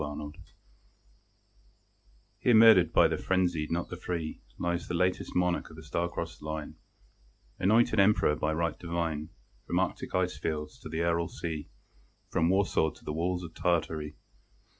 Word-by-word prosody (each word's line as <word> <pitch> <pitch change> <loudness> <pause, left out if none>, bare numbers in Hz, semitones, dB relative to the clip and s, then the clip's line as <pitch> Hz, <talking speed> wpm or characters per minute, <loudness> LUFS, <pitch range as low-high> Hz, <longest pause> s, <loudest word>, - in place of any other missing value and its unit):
EPITAPH 75 0 -6 2.0
Here 120 - +4
murdered 110 -7 +7
by - - +6
the - - -1
frenzied, 90 -5 0
not 85 +1 -2
the - - -5
free, 85 -3 -4 0.2
Lies 85 0 -2
the 90 - -2
latest 90 +2 0
monarch 90 -1 +1
of 80 - -13
a 80 - -10
star 85 +3 -1
crossed - - -6
line; 75 0 -5 0.8
Anointed 110 +1 +3
Emperor 100 -6 +4
by 75 +1 -1
right 85 +1 -1
divine, 85 -3 -2 0.4
From - - +1
Arctic - - -2
icefields 80 -4 -2
to - - -8
the 80 +1 -2
Aral 85 0 +1
sea, 80 -3 -5 0.6
From 80 +1 +2
Warsaw 95 -4 +2
to - - -17
the 75 - -3
walls 90 +3 -1
of 85 -1 -8
Tartary. 80 -3 -1
85 Hz, 150 wpm, -29 LUFS, 80-90 Hz, 2.0 s, murdered